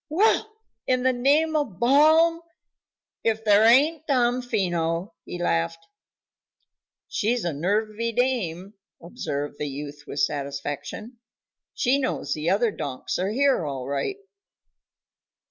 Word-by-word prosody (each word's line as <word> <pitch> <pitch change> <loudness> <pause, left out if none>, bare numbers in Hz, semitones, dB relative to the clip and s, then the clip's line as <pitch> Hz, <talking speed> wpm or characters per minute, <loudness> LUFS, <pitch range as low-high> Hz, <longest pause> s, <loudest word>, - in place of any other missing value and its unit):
"Well! 430 +6 +2 0.4
In 255 -1 +1
the 260 0 +3
name 290 +6 +2
of 235 -12 -1
Balaam, 315 +7 +5 0.8
if 220 -1 0
there 210 0 +5
ain't 300 +7 +4
Damfino!" 215 - 0
he - - -6
laughed. 165 - -1 1.2
"She's 230 0 -1
a 170 - -1
nervy 215 +8 -1
dame," 210 -7 -1 0.3
observed 145 - -5
the 150 - -2
youth 145 +1 -8
with 145 - -5
satisfaction. 145 - -4 0.6
"She 265 +3 +2
knows 255 - -2
the 155 +2 -2
other 220 +3 +2
donks 135 -5 -4
are 185 +2 0
here, 270 -2 +2
all 135 -4 -4
right." 140 - -2
215 Hz, 115 wpm, -25 LUFS, 160-260 Hz, 1.2 s, Balaam